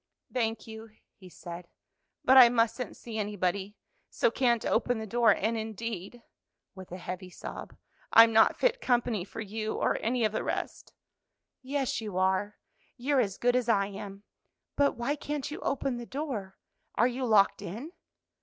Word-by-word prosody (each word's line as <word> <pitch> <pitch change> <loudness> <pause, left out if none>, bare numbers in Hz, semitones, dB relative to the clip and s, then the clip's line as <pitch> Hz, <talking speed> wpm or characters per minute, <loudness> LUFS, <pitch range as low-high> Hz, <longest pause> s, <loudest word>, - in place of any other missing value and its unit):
"Thank 225 -3 -1
you," 220 0 -10 0.2
he 185 -2 -15
said, 170 0 -9 0.6
"but 265 - +6
I 250 -2 +10
mustn't 235 +1 0
see 225 -2 -6
anybody, 200 0 -2 0.3
so - - +1
can't 240 -3 +1
open 245 +1 +1
the 220 - -5
door; 235 +1 +3
and, 220 +2 +2
indeed," 220 0 -5 0.5
with 190 -2 -12
a 180 - -5
heavy 185 +1 -7
sob, - - -9 0.4
"I'm 225 0 +8
not 220 - +5
fit - - +1
company 240 -5 +1
for 210 - -8
you 215 +1 -4
or - - 0
any 235 0 +1
of 215 - +1
the 220 - -2
rest." - - -4 0.7
"Yes, 270 -2 -2
you 210 -4 -5
are, 190 +2 +1 0.4
you're 270 +2 +1
as 200 -4 -2
good 245 0 +2
as 250 -2 0
I 200 -3 +3
am. 200 0 -9 0.5
But 285 0 +2
why 240 +5 -1
can't 295 -1 -4
you 310 - -6
open 275 -2 -1
the 240 -1 -7
door? 260 -10 -5 0.4
are 240 - +4
you 255 +1 -3
locked 205 -3 +4
in?" 235 - -7
225 Hz, 165 wpm, -29 LUFS, 200-250 Hz, 0.7 s, I